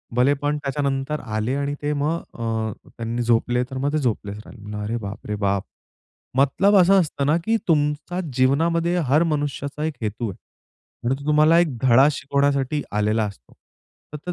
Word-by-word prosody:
भलेपण 145 +3 +2
त्याच्यानंतर 140 0 -2
आले 110 +2 -2
आणि 140 0 -1
ते 145 0 -1
मग 150 +3 0 0.2
अ, 110 -1 -2 0.3
त्यांनी 115 +1 -3
झोपले 120 +1 +2
तर 130 - -4
मग 140 +2 0
ते - - +2
झोपलेच 110 -7 -2
राहिले. 105 -2 -10
अरे 110 +3 -2
बाप 100 -3 -7
रे 105 - -2
बाप! 100 -1 0 0.7
मतलब 190 +10 +4
असा 190 +1 +6
असतं 145 -5 -1
ना, 150 +3 +3
की 225 +1 +2
तुमचा 150 +2 0
जीवनामध्ये 165 +7 +2
हर 150 +6 +4
मनुष्याचा 145 -2 -2
एक 160 - -2
हेतू 110 +1 -2
आहे 100 +4 -13
आणि 130 - +2
तो - - -9
तुम्हाला 155 +2 +5
एक 155 -8 +1
धडा 130 +2 +6
शिकवण्यासाठी 140 0 0
आलेला 105 +1 +1
असतो. 95 -12 -10 0.6
तर 155 +4 -5
140 Hz, 165 wpm, -23 LUFS, 115-150 Hz, 0.7 s, असा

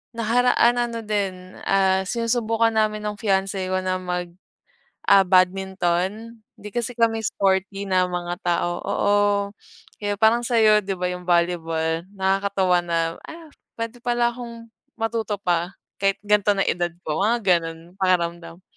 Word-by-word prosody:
Nakaraan 240 +1 +3
ano, 235 -1 -1
din, 190 -3 -3
ah, 190 -1 +3
sinusubukan 230 +1 0
namin 215 -1 0
ng 210 0 -2
fiance 195 -2 0
ko 185 - 0
na 185 0 0
mag 180 -1 -3 0.8
ah, 195 -1 +7
badminton 190 +4 0 0.2
di 210 - -7
kasi 240 +3 -3
kami 225 -1 +2
sporty 195 0 0
na 185 -1 +3
mga 175 -1 -4
tao 175 0 0
oo, 205 0 +1 0.8
kaya 205 -1 -2
parang 225 +3 +3
sa'yo 220 -3 +4
di 195 - -1
ba 180 0 -1
yung 180 0 -6
volleyball 165 -1 0
nakakatuwa 190 -1 +1
na, 165 -1 -1
ah, 320 -1 -11 0.3
pwede 230 +1 -4
pala 240 0 +2
akong 235 -2 -9 0.3
matuto 225 -2 -2
pa, 175 0 0 0.3
kahit 195 0 +2
ganto 210 0 +3
na 195 - -1
ang - - +1
edad 175 0 -1
ko 155 0 -2
mga 225 +4 +2 0.2
ganun 165 -1 -6 0.2
pakiramdam. 175 -2 -1
195 Hz, 145 wpm, -23 LUFS, 180-225 Hz, 0.8 s, ah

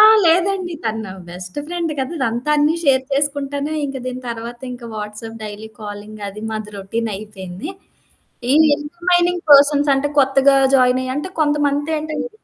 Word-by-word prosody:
ఆ! - - +10 0.2
లేదండీ. 360 +2 +2
తను 225 0 -1
నా - - -8 0.2
బెస్ట్ 180 +5 -8
ఫ్రెండ్ 340 -1 -2
కదా! 265 +5 -3
అదంతా 245 +1 -1
అన్నీ 295 +2 +3
షేర్ 265 -2 +4
చేసుకుంటానే, 285 +1 -1
ఇంక 275 -1 -5
దీని 255 0 -4
తర్వాతింక 240 +2 -6
వాట్సాప్ 215 +2 -7
డైలీ 210 +1 -7
కాలింగ్ 210 0 -8
అది, 205 +2 -8
మాది 215 -1 -4
రొటీన్ 225 +4 -3
అయిపోయింది. 195 - -7 0.8
ఈ - - +5 0.2
ఇంటర్మైనింగ్ 345 +3 0
పర్సన్స్ 285 +1 +7
అంటే 270 +2 0
కొత్తగా 270 0 +5 0.2
జాయినయ్యి 255 0 +3
అంటే 295 +6 -3
కొంతమందేంటంటే 295 +5 0
270 Hz, 140 wpm, -19 LUFS, 220-295 Hz, 0.8 s, ఆ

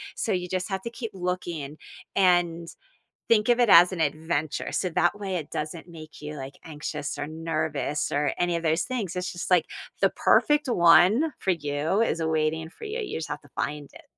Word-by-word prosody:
So 220 - -2
you 180 -1 -2
just 185 0 -2
have 190 -1 -2
to 235 - -4
keep 230 -1 -6
looking 175 -5 -4 0.4
and 175 -3 +2 0.6
think 220 0 +3
of 240 - +4
it 240 - +4
as 175 +2 +8
an 175 - -4
adventure. 155 0 -1
So 185 - 0
that 175 +5 +1
way 195 -2 -4
it 155 -4 -5
doesn't 160 +3 -5
make 155 -3 -12
you 150 0 -6
like 135 0 -7
anxious 150 -1 -5
or 145 - -3
nervous 155 -2 -2
or 145 -1 +1
any 175 -1 +1
of 170 - -4
those 160 +1 +2
things. 215 -9 -4
It's 180 0 -3
just 175 - -6
like 180 -3 +4 0.3
the - - +4
perfect 295 -2 +3
one 185 - +5
for 190 - 0
you 150 +3 0
is 170 -7 0
awaiting 160 0 0
for 445 - -11
you. 440 +3 -4
You 415 - -4
just 160 - -5
have 145 0 -5
to - - -18
find 150 -1 -3
it. - - -14
170 Hz, 205 wpm, -26 LUFS, 155-185 Hz, 0.6 s, as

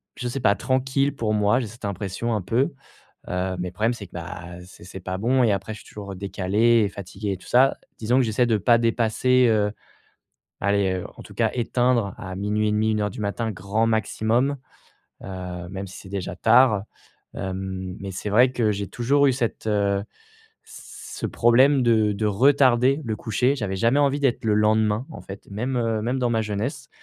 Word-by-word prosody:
je 125 - -4
sais 135 +3 -3
pas, 100 -2 +4
tranquille 135 +3 0
pour 110 -3 -1
moi. 105 +3 +3
J'ai 115 - -4
cette 115 0 -10
impression 100 +4 -3
un 105 - -1
peu. 115 +10 0 0.5
Heu, 90 +1 -2
mais 90 - -2
le - - -15
problème 110 +5 +1
c'est 100 -5 -9
que, - - -36
bah, 90 +1 -7 0.2
c'est 90 - -15
c'est 95 +1 -9
pas 95 0 -4
bon 125 +5 +2
et 110 - +3
après 105 +2 -2
je 105 - -10
suis - - -16
toujours, 100 -2 -8
heu, - - -8
décalé 105 +4 +2
et - - -2
fatigué 100 +1 -6
et - - -6
tout - - -17
ça, 130 +2 +4 0.2
disons 115 +3 0
que 130 - +4
j'essaie 115 +2 +1
de 110 -2 +2
pas 115 +4 +4
dépasser, 120 +2 +2
heu, 105 -2 +2 0.9
aller, 100 -1 +1
heu, - - -6
en - - -10
tout - - -14
cas - - +1
éteindre 120 -4 +1
à 95 -1 -6
00:30, 105 +2 0
01:00 105 -1 0
du - - -11
matin, 110 +2 -2
grand 100 +4 -1
maximum. 115 +5 +1 0.7
Heu, 90 -2 -6
même 95 0 -5
si 90 - -11
c'est 95 - -12
déjà 95 -2 -4
tard, 115 -3 +4 0.5
hem, 95 -1 -5
mais 100 0 -5
c'est 100 - -5
vrai 125 +4 +5
que 110 -4 +1
j'ai 100 -1 -3
toujours 140 +4 +2
eu 135 - +4
cette 120 -3 -3
heu, 100 -1 +1 0.6
ce - - -9
problème 130 +4 +4
de 110 -3 +3
de 105 +2 -2
retarder 130 +3 +4
le 110 -1 -2
coucher. 125 +4 +1
J'avais 105 -7 -3
jamais 120 +7 +2
envie 140 0 +2
d'être 130 -4 +1
le 105 - +3
lendemain 110 +2 +2
en - - -9
fait, 100 +1 -11
même, 125 +5 -2
heu, 115 -2 0
même 125 +4 -1
dans 125 -2 +1
ma 115 -1 +1
jeunesse 115 +7 -4
110 Hz, 200 wpm, -24 LUFS, 100-125 Hz, 0.9 s, vrai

